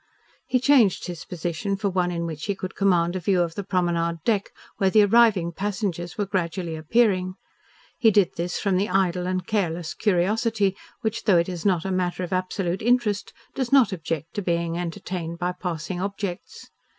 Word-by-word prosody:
He 255 - +2
changed 250 -7 +4
his 175 -2 -6
position 175 +3 -3
for 200 +1 -2
one 180 -1 +1
in 170 -1 -2
which 155 -2 -5
he 200 - -1
could 185 0 -6
command 175 -3 +2
a - - -1
view 185 +1 +1
of 170 -1 -4
the 200 - -4
promenade 170 -3 0
deck 210 -4 +1 0.3
where 195 - +3
the 215 +2 +6
arriving 205 -5 +4
passengers 190 -2 -3
were 205 - 0
gradually 175 -3 -2
appearing. 185 +2 +1 0.6
He 225 - +6
did 200 -3 +3
this 175 +1 -2
from 195 -3 +1
the 200 +3 0
idle 180 -1 +1
and 185 0 -1
careless 175 -5 -1
curiosity 205 +1 +1 0.3
which, 220 -1 -2
though 190 -4 +5
it 170 - +2
is 180 +1 -2
not 180 -3 +1
a 190 - -1
matter 185 0 -1
of 180 - -4
absolute 185 0 -1
interest, 230 -3 +1 0.2
does 260 -2 -2
not 270 -6 +5
object 165 -2 -4
to 205 - -2
being 170 -2 -1
entertained 175 -1 -4
by 180 +1 -1
passing 180 0 -4
objects. 200 -2 -5
185 Hz, 185 wpm, -24 LUFS, 175-205 Hz, 0.6 s, the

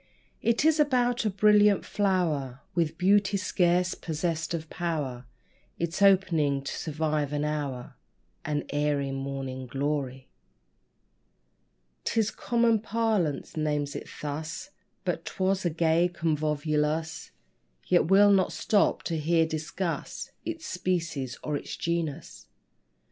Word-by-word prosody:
It 235 +5 +2
is 315 -1 +4
about 245 -5 +2
a - - +3
brilliant 210 0 +4
flower, 160 -10 0
With 165 -4 0
beauty 200 +2 +3
scarce 180 -1 +2
possessed 160 0 -3
of 160 -1 -5
power 145 -8 -3 0.5
Its 170 +3 -3
opening 165 -8 +4
to 140 - -4
survive 155 -2 -1
an 150 0 -1
hour 145 -5 -3 0.5
An 145 -1 -1
airy 145 -1 0
Morning 135 -1 -4
Glory. 135 0 -2 1.8
'Tis 220 -1 +1
common 235 -2 +2
parlance 215 -9 -1
names 150 -2 -1
it - - -6
thus; 155 - -5 0.3
But - - -1
'twas 190 0 -1
a - - +3
gay 165 +2 +2
convolvulus: 155 -1 -1 0.6
Yet 175 -2 +3
we'll 200 +2 +6
not 190 -2 +3
stop 205 -2 +2
to 165 -2 -2
here 165 +2 +3
discuss 160 +3 -4
Its 330 -1 -5
species 170 -8 -2
or 150 - -2
its - - -5
genus. 170 -4 -3
165 Hz, 115 wpm, -28 LUFS, 145-195 Hz, 1.8 s, we'll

